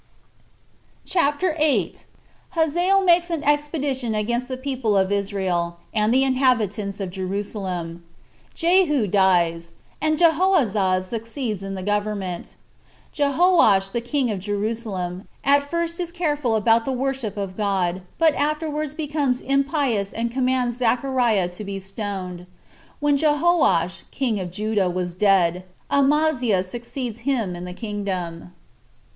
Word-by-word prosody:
CHAPTER 335 Hz, 0 st, +1 dB
8. 300 Hz, -2 st, +1 dB, 0.5 s
Hazael 350 Hz, +5 st, +3 dB
Makes 345 Hz, -1 st, +4 dB
An 330 Hz, -3 st, -2 dB
Expedition 290 Hz, -5 st, 0 dB
Against 235 Hz, +4 st, -1 dB
The 260 Hz, -1 st, -4 dB
People 255 Hz, -6 st, -1 dB
Of 190 Hz, 0 st, +2 dB
Israel 190 Hz, -4 st, -1 dB, 0.2 s
And 215 Hz, 0 st, +2 dB
The 260 Hz, +2 st, +4 dB
Inhabitants 225 Hz, -7 st, +1 dB
Of 190 Hz, -2 st, -4 dB
Jerusalem. 185 Hz, -3 st, -4 dB, 0.5 s
Jehu 335 Hz, -, +3 dB
Dies, 175 Hz, -4 st, +2 dB, 0.3 s
And 310 Hz, 0 st, +1 dB
Jehoahaz 285 Hz, -, +3 dB
Succeeds 230 Hz, 0 st, -4 dB
In 195 Hz, 0 st, -5 dB
The 185 Hz, -, -5 dB
Government. 205 Hz, -3 st, -3 dB, 0.6 s
Jehoash 280 Hz, -, +3 dB
The 235 Hz, -, -2 dB
King 250 Hz, 0 st, 0 dB
Of 200 Hz, -, -3 dB
Jerusalem 205 Hz, -2 st, -3 dB, 0.2 s
At 285 Hz, 0 st, +3 dB
First 335 Hz, +1 st, -2 dB
Is 345 Hz, -1 st, -3 dB
Careful 295 Hz, -9 st, 0 dB
About 225 Hz, +2 st, +3 dB
The 270 Hz, -, -1 dB
Worship 260 Hz, -5 st, -2 dB
Of 195 Hz, -2 st, -4 dB
God 190 Hz, -3 st, 0 dB, 0.2 s
But 325 Hz, -2 st, +4 dB
Afterwards 300 Hz, 0 st, -2 dB
Becomes 290 Hz, -5 st, -1 dB
Impious 275 Hz, -7 st, 0 dB
And 230 Hz, +1 st, -2 dB
Commands 255 Hz, -1 st, 0 dB
Zechariah 240 Hz, -5 st, +1 dB
To 180 Hz, +4 st, -8 dB
Be 195 Hz, -1 st, -5 dB
Stoned. 190 Hz, -2 st, -6 dB, 0.5 s
When 290 Hz, -1 st, +2 dB
Jehoash 295 Hz, -, +2 dB
[King 240 Hz, -7 st, -1 dB
Of 180 Hz, -2 st, -4 dB
Judah] 205 Hz, 0 st, 0 dB
Was 180 Hz, 0 st, -3 dB
Dead, 180 Hz, -2 st, +2 dB, 0.3 s
Amaziah 275 Hz, -8 st, +2 dB
Succeeds 235 Hz, +3 st, -6 dB
Him 230 Hz, -8 st, -1 dB
In 175 Hz, +1 st, -7 dB
The 180 Hz, -, -6 dB
Kingdom. 185 Hz, -5 st, -5 dB
230 Hz, 125 wpm, -23 LUFS, 195-285 Hz, 0.6 s, Makes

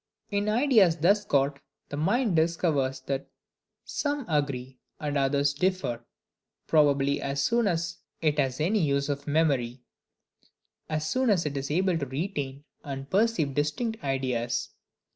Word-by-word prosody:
In 205 Hz, +1 st, 0 dB
ideas 215 Hz, -, +4 dB
thus 200 Hz, +6 st, +3 dB
got, 140 Hz, -4 st, +1 dB, 0.3 s
the -, -, -4 dB
mind 200 Hz, -, +1 dB
discovers 160 Hz, -5 st, +1 dB
that 135 Hz, +1 st, -3 dB, 0.6 s
some 290 Hz, -3 st, -2 dB
agree 135 Hz, -4 st, -2 dB, 0.2 s
and 145 Hz, -1 st, -3 dB
others 140 Hz, 0 st, +2 dB
differ, 165 Hz, -8 st, -1 dB, 0.6 s
probably 140 Hz, -2 st, +3 dB
as 140 Hz, 0 st, -1 dB
soon 235 Hz, +5 st, +2 dB
as 170 Hz, -2 st, -1 dB, 0.2 s
it 150 Hz, -2 st, +1 dB
has 130 Hz, -1 st, 0 dB
any 190 Hz, +8 st, +2 dB
use 140 Hz, -2 st, +1 dB
of 145 Hz, 0 st, -3 dB
memory; 135 Hz, -5 st, +1 dB, 1.1 s
as 155 Hz, 0 st, -1 dB
soon 255 Hz, +6 st, +1 dB
as 185 Hz, -6 st, +3 dB
it 145 Hz, -1 st, -2 dB
is 135 Hz, 0 st, -3 dB
able 180 Hz, +2 st, +1 dB
to 140 Hz, -, -3 dB
retain 140 Hz, -1 st, -4 dB, 0.2 s
and 135 Hz, -1 st, -6 dB
perceive 195 Hz, -8 st, +2 dB
distinct 185 Hz, -, -1 dB
ideas. 125 Hz, -3 st, -1 dB
150 Hz, 140 wpm, -27 LUFS, 140-185 Hz, 1.1 s, ideas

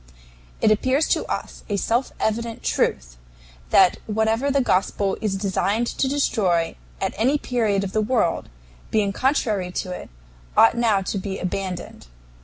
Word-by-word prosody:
It 215 Hz, -, +4 dB
appears 260 Hz, +8 st, +2 dB
to -, -, +1 dB
us -, -, -5 dB
a 205 Hz, -, 0 dB
self 235 Hz, +6 st, 0 dB
evident 230 Hz, +1 st, -2 dB
truth -, -, -1 dB, 0.5 s
that 185 Hz, -2 st, +5 dB
whatever 220 Hz, +5 st, +1 dB
the 280 Hz, 0 st, +2 dB
Gospel 195 Hz, -4 st, +1 dB
is 210 Hz, -3 st, 0 dB
designed 200 Hz, +3 st, 0 dB
to 265 Hz, -, -1 dB
destroy 195 Hz, -, +1 dB, 0.2 s
at -, -, -1 dB
any 260 Hz, +7 st, +3 dB
period 220 Hz, -8 st, 0 dB
of 195 Hz, -, -4 dB
the 215 Hz, -, +1 dB
world, 215 Hz, -6 st, 0 dB, 0.4 s
being 205 Hz, -2 st, +1 dB
contrary 215 Hz, -8 st, 0 dB
to 185 Hz, -, -3 dB
it, 180 Hz, -, -7 dB, 0.5 s
ought 225 Hz, -, +7 dB
now 220 Hz, -5 st, +2 dB
to 200 Hz, -, -3 dB
be 195 Hz, 0 st, -4 dB
abandoned. 185 Hz, -, -5 dB
215 Hz, 150 wpm, -23 LUFS, 190-235 Hz, 0.5 s, ought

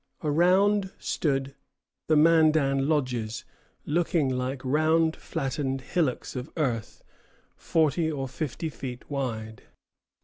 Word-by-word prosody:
Around 190 Hz, +6 st, +3 dB
stood 135 Hz, -3 st, -1 dB, 0.5 s
the 155 Hz, -, +4 dB
Mandan 155 Hz, -3 st, +4 dB
lodges, 125 Hz, -6 st, -1 dB, 0.4 s
looking 165 Hz, -2 st, +1 dB
like 130 Hz, +1 st, -3 dB
round 160 Hz, +4 st, +2 dB
flattened 135 Hz, 0 st, -3 dB
hillocks 140 Hz, -2 st, -1 dB
of 125 Hz, +4 st, -5 dB
earth, 120 Hz, -8 st, -2 dB, 0.5 s
forty 160 Hz, 0 st, +1 dB
or 135 Hz, -3 st, -3 dB
fifty 155 Hz, +4 st, -4 dB
feet 125 Hz, -4 st, -7 dB
wide. 110 Hz, -6 st, -4 dB
145 Hz, 100 wpm, -27 LUFS, 130-160 Hz, 0.5 s, the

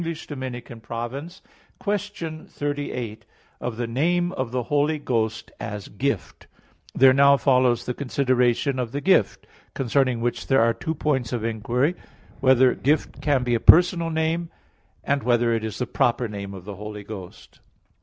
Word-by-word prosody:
_______________________ 130 Hz, -2 st, -6 dB, 0.4 s
QUESTION 200 Hz, -6 st, -4 dB
38 140 Hz, -6 st, -4 dB, 0.4 s
OF 120 Hz, -2 st, -4 dB
THE 120 Hz, -, -1 dB
NAME 175 Hz, +9 st, +1 dB
OF 130 Hz, -8 st, -3 dB
THE 125 Hz, +1 st, -2 dB
HOLY 145 Hz, +4 st, +1 dB
GHOST, 115 Hz, -6 st, -2 dB
AS 105 Hz, -1 st, -6 dB
GIFT 125 Hz, 0 st, -3 dB
(In -, -, -34 dB
Two -, -, -39 dB
Articles) -, -, -15 dB
There 130 Hz, -1 st, +8 dB
now 140 Hz, +1 st, +6 dB
follows 130 Hz, -3 st, +2 dB
the 125 Hz, -, -2 dB
consideration 130 Hz, -1 st, +1 dB
of 120 Hz, -2 st, -3 dB
the 145 Hz, -, -2 dB
Gift; 185 Hz, -, +2 dB, 0.3 s
concerning 130 Hz, -1 st, +1 dB
which 120 Hz, +1 st, -2 dB
there 135 Hz, -4 st, +4 dB
are 115 Hz, 0 st, +3 dB
two 160 Hz, +5 st, -4 dB
points 135 Hz, -6 st, -1 dB
of 120 Hz, -3 st, -2 dB
inquiry: 120 Hz, +7 st, 0 dB
(1) -, -, -21 dB, 0.4 s
Whether 130 Hz, -1 st, +5 dB
"Gift" 150 Hz, +3 st, 0 dB
can 140 Hz, -4 st, +2 dB
be 120 Hz, -1 st, 0 dB
a 115 Hz, -, +2 dB
personal 170 Hz, +4 st, +5 dB
name? 160 Hz, +1 st, -1 dB, 0.6 s
(2) 140 Hz, -, +3 dB
Whether 120 Hz, -3 st, +2 dB
it 115 Hz, -1 st, -1 dB
is 110 Hz, -1 st, -4 dB
the 125 Hz, -, -1 dB
proper 120 Hz, 0 st, +1 dB
name 100 Hz, -2 st, -7 dB
of 95 Hz, -2 st, -10 dB
the 100 Hz, -2 st, -7 dB
Holy 105 Hz, 0 st, -7 dB
Ghost? 100 Hz, -4 st, -10 dB
130 Hz, 165 wpm, -24 LUFS, 115-145 Hz, 0.6 s, There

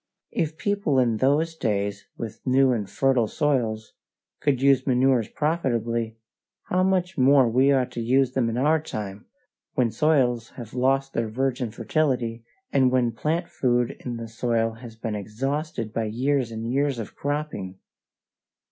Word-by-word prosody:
If 160 Hz, -1 st, -2 dB
people 200 Hz, -7 st, 0 dB
in 120 Hz, -4 st, +3 dB
those 150 Hz, +6 st, +2 dB
days, 100 Hz, -6 st, -2 dB
with 115 Hz, -1 st, -6 dB
new 130 Hz, +1 st, +4 dB
and 105 Hz, -5 st, -2 dB
fertile 130 Hz, 0 st, +2 dB
soils, 115 Hz, -6 st, -1 dB, 0.5 s
could 140 Hz, -4 st, +1 dB
use 135 Hz, -1 st, +3 dB
manures 130 Hz, -2 st, +3 dB
profitably, 120 Hz, -7 st, -1 dB, 0.5 s
how 180 Hz, -, +2 dB
much 185 Hz, -3 st, +1 dB
more 135 Hz, +1 st, +6 dB
ought 115 Hz, -, -1 dB
we 130 Hz, +2 st, +4 dB, 0.2 s
to 120 Hz, -, -6 dB
use 130 Hz, +2 st, +2 dB
them 130 Hz, -3 st, +1 dB
in 115 Hz, -, -3 dB
our 150 Hz, +4 st, +3 dB
time, 105 Hz, -8 st, -6 dB, 0.5 s
when 120 Hz, -3 st, +2 dB
soils 125 Hz, -7 st, +1 dB
have 120 Hz, -3 st, -8 dB
lost 135 Hz, +2 st, +1 dB
their 115 Hz, -1 st, -1 dB
virgin 125 Hz, +1 st, -1 dB
fertility, 120 Hz, -1 st, -1 dB, 0.3 s
and 130 Hz, -2 st, +4 dB
when 125 Hz, -2 st, +2 dB
the -, -, -19 dB
plant 160 Hz, +9 st, -1 dB
food 120 Hz, -2 st, +1 dB
in 120 Hz, -2 st, -4 dB
the 115 Hz, 0 st, -6 dB
soil 115 Hz, 0 st, 0 dB
has 115 Hz, 0 st, -11 dB
been 110 Hz, -1 st, -4 dB
exhausted 115 Hz, -, -3 dB
by 115 Hz, -, -1 dB
years 130 Hz, +3 st, 0 dB
and 115 Hz, +1 st, -4 dB
years 140 Hz, -1 st, +1 dB
of 115 Hz, -, -7 dB
cropping! 145 Hz, -11 st, -3 dB
125 Hz, 155 wpm, -25 LUFS, 115-140 Hz, 0.5 s, more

